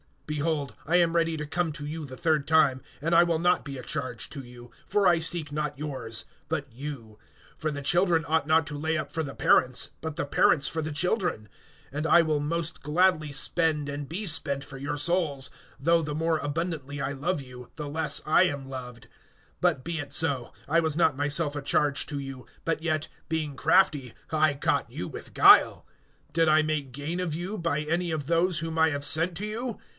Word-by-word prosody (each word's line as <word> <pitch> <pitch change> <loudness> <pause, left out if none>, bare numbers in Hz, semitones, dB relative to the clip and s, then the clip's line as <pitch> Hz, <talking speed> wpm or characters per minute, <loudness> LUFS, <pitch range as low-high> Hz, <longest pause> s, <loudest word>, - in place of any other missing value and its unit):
(14)Behold, 150 -1 -1
I 165 - +1
am 170 -2 +4
ready 165 -1 +1
to 150 -1 -4
come 160 +1 -1
to 145 -1 -6
you 155 +1 -5
the 130 -2 -9
third 155 0 0
time; 145 -5 +4 0.2
and 165 +3 0
I 170 - +7
will 170 -1 +2
not 175 +1 +2
be 140 -2 -6
a 125 - -8
charge 130 -6 -4
to 145 - -7
you; 120 -1 -13 0.2
for 205 -1 +2
I 170 -3 +5
seek 165 -2 -1
not 150 -1 -3
yours, 130 -7 -2 0.2
but 150 -3 -2
you; 115 -4 -8 0.4
for 155 - -2
the 145 -1 -5
children 175 +2 +3
ought 160 -1 0
not 160 +1 +4
to 150 - -4
lay 160 +2 -1
up 155 - -4
for 160 - -2
the 135 -2 -7
parents, 125 -1 +3
but 160 -2 -5
the - - -1
parents 145 0 +3
for 160 - -2
the 155 0 -4
children. 175 - 0 0.4
(15)And 150 +2 -3
I 170 - +6
will 155 -2 0
most 165 +3 -2
gladly 155 -1 +2
spend 150 0 +1
and 145 0 -5
be 190 +8 -3
spent 140 -5 +3
for 135 0 -10
your 145 +2 -3
souls; 145 -3 0 0.3
though 165 +5 +3
the 150 -2 -4
more 160 +1 +1
abundantly 145 -2 -3
I 135 - -2
love 150 +4 -2
you, 125 -2 -11
the 150 -2 -5
less 150 0 0
I 155 +4 +5
am 140 -7 -2
loved. 125 -3 -8 0.5
(16)But 130 - +2
be 170 -1 -3
it 145 -1 -6
so, 140 -6 0
I 165 +4 +3
was 160 -2 -1
not 160 -4 +2
myself 145 +1 0
a - - -3
charge 145 0 +1
to 145 - -5
you[12:16]; 135 -2 -7 0.2
but 165 -1 -1
yet, 155 -2 -1 0.2
being 155 -3 -3
crafty, 150 -11 +3 0.2
I 155 -2 +3
caught 140 - 0
you - - -6
with - - -10
guile. - - +6 0.5
(17)Did 165 0 +3
I 155 0 +5
make 150 -4 -2
gain 150 +6 -4
of 175 -4 -2
you, 185 +6 -4
by 165 -4 -1
any 170 +3 -1
of 155 -3 -3
those 170 +1 +2
whom 165 0 -3
I 160 0 +5
have 145 0 -3
sent 165 +4 +3
to 205 - -3
you? 225 +2 -4
155 Hz, 210 wpm, -27 LUFS, 140-165 Hz, 0.5 s, I